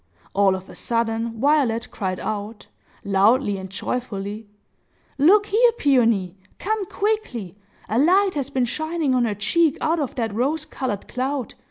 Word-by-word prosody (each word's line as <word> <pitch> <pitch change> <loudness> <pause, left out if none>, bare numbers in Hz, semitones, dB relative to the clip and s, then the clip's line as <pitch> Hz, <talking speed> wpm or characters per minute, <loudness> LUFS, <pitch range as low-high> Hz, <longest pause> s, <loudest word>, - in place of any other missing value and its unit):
All 195 -1 +3
of 190 0 -8
a - - -12
sudden, 230 -1 -2
Violet 265 -5 +2
cried 185 -2 -3
out, 210 0 -5 0.4
loudly 205 +2 +3
and 190 0 -7
joyfully,—"Look 220 - -2
here, 465 +4 +4
Peony! 230 - +2 0.2
Come 425 -1 -2
quickly! 390 - -2 0.3
A 225 - 0
light 375 +6 +4
has 280 -2 -3
been 260 -3 0
shining 315 +2 -1
on 250 -1 +2
her 210 -3 -1
cheek 310 - +2
out 320 +1 +1
of 285 -4 -3
that 225 -4 -2
rose 285 +8 -1
colored 230 -10 -4
cloud! 260 0 -3
245 Hz, 145 wpm, -23 LUFS, 205-310 Hz, 0.4 s, here